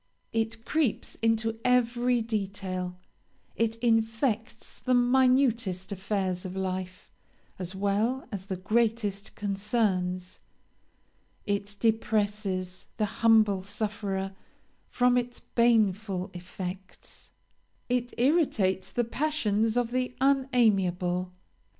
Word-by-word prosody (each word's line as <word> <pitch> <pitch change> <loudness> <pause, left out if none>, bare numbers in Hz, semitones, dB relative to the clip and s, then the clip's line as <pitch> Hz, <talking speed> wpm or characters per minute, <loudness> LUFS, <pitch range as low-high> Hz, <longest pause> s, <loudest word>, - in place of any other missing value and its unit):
It 225 0 -1
creeps 305 -8 0
into 225 0 +1
every 245 -1 +2
detail; 195 -4 -3 0.6
it 225 0 +1
infects 225 0 0
the 255 -1 +1
minutest 245 -6 +3
affairs 190 -2 -2
of 185 0 -6
life 185 -1 -4 0.5
as 185 +1 -4
well 205 +7 0
as 195 -2 -6
the 190 -2 -3
greatest 215 0 0
concerns. 195 -3 -1 1.1
It 205 0 -2
depresses 205 -4 0
the 215 - +2 0.2
humble 215 -4 +5
sufferer 200 -1 -3 0.6
from 250 0 +3
its 245 0 -5
baneful 210 -5 +1
effects; 180 +1 -8 0.6
it 245 -1 0
irritates 225 - +2
the 240 - +1
passions 230 -4 0
of 240 -1 +1
the 250 0 -1
unamiable. 195 -10 +2
215 Hz, 95 wpm, -28 LUFS, 190-235 Hz, 1.1 s, humble